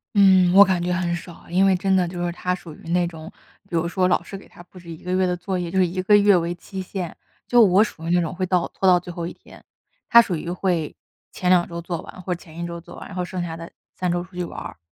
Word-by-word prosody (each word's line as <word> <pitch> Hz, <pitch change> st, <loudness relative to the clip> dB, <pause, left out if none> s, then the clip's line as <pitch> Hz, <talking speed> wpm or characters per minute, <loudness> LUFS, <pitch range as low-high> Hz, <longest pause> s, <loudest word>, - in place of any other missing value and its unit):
嗯， 190 Hz, -3 st, +6 dB
我 200 Hz, +1 st, +10 dB
感 185 Hz, -3 st, 0 dB
觉 180 Hz, +1 st, -1 dB
很 175 Hz, -1 st, -1 dB
少， 170 Hz, -1 st, -11 dB
因 185 Hz, +3 st, +3 dB
为 190 Hz, -1 st, +4 dB
真 190 Hz, +1 st, +1 dB
的 180 Hz, -2 st, +2 dB
就 175 Hz, 0 st, -4 dB
是 175 Hz, -, -1 dB
他 180 Hz, +1 st, -2 dB
属 170 Hz, -3 st, -11 dB
于 165 Hz, -, -12 dB
那 175 Hz, 0 st, +2 dB
种， 160 Hz, -1 st, -9 dB, 0.4 s
比 170 Hz, -, -4 dB
如 165 Hz, +1 st, +1 dB
说 185 Hz, +1 st, +1 dB
老 180 Hz, -, +1 dB
师 195 Hz, -, -8 dB
给 -, -, -15 dB
他 175 Hz, -, -15 dB
布 180 Hz, +1 st, -16 dB
置 170 Hz, -1 st, -13 dB
1 160 Hz, -, -7 dB
个 180 Hz, -, -4 dB
月 185 Hz, 0 st, +2 dB
的 180 Hz, -, 0 dB
作 185 Hz, 0 st, -3 dB
业， 175 Hz, -1 st, -3 dB
就 190 Hz, -, -3 dB
是 185 Hz, -, +5 dB
1 185 Hz, +2 st, -3 dB
个 205 Hz, +2 st, +5 dB
月 205 Hz, -1 st, +5 dB
为 175 Hz, 0 st, 0 dB
期 190 Hz, +2 st, -7 dB
限， 185 Hz, -2 st, -5 dB, 0.3 s
就 245 Hz, -1 st, +5 dB
我 200 Hz, 0 st, +6 dB
属 165 Hz, -6 st, -7 dB
于 -, -, -2 dB
那 175 Hz, 0 st, +3 dB
种 165 Hz, +1 st, -3 dB
会 185 Hz, +1 st, -2 dB
到 180 Hz, -1 st, +1 dB
拖 190 Hz, -, 0 dB
到 180 Hz, -1 st, +6 dB
最 175 Hz, -, -9 dB
后 170 Hz, -1 st, -4 dB
1 -, -, -7 dB
天， -, -, -17 dB, 0.5 s
他 235 Hz, -1 st, +9 dB
属 190 Hz, -6 st, -2 dB
于 165 Hz, +2 st, -5 dB
会 175 Hz, -4 st, -1 dB, 0.4 s
前 180 Hz, -, -2 dB
2 180 Hz, -1 st, +4 dB
周 170 Hz, 0 st, -6 dB
做 170 Hz, -1 st, -4 dB
完 185 Hz, -, -11 dB
或 180 Hz, 0 st, -2 dB
者 175 Hz, -, -8 dB
前 160 Hz, -1 st, -14 dB
1 170 Hz, -, -3 dB
周 170 Hz, 0 st, -6 dB
做 175 Hz, -, -13 dB
完， -, -, -9 dB
然 195 Hz, -, -10 dB
后 180 Hz, -, -1 dB
剩 180 Hz, -1 st, -4 dB
下 165 Hz, -1 st, -5 dB
的 165 Hz, 0 st, -9 dB, 0.2 s
3 180 Hz, -1 st, -1 dB
周 175 Hz, 0 st, -1 dB
出 185 Hz, 0 st, -17 dB
去 180 Hz, -, -2 dB
玩。 165 Hz, -, -8 dB
180 Hz, 300 characters per minute, -23 LUFS, 170-185 Hz, 0.5 s, 我